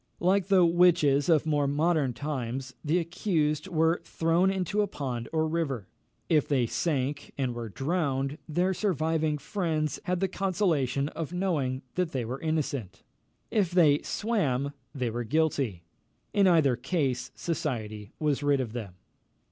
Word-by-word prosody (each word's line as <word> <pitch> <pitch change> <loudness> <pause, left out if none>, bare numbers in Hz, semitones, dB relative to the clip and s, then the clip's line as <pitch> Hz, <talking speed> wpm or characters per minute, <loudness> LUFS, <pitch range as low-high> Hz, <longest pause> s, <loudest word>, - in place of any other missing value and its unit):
Like 185 +1 +2
the 190 -3 +5
witches 170 -4 +4
of 160 -2 +4
more 145 -2 +1
modern 150 -2 +1
times, 130 -2 -4
the 155 +3 +2
accused 165 -2 0
were 165 -1 +2
thrown 165 +3 +2
into 195 +2 0
a 205 - +1
pond 125 -9 -4
or 160 0 +1
river; 150 - -2 0.4
if 155 -4 +3
they 130 -4 +2
sank, 140 +1 -2
and 130 -3 -1
were 120 -1 -5
drowned, 140 - -1
their 180 +5 +1
surviving 160 -5 0
friends 155 -3 -2
had 180 0 0
the 195 - +1
consolation 165 -9 0
of 165 +1 -5
knowing 150 -9 -1
that 180 -3 -1
they 125 -3 -1
were 125 +4 -5
innocent; 140 - -2 0.5
if 205 -6 +2
they 160 -5 +4
swam, 145 - -1 0.2
they 125 -4 -1
were 120 +2 -3
guilty. 135 - 0 0.5
In 200 -2 +4
either 155 -8 +4
case 135 -1 -1
society 110 -11 -3
was 150 -2 0
rid 145 -1 +2
of 120 -4 -3
them. 105 -7 -6
150 Hz, 150 wpm, -28 LUFS, 135-175 Hz, 0.5 s, the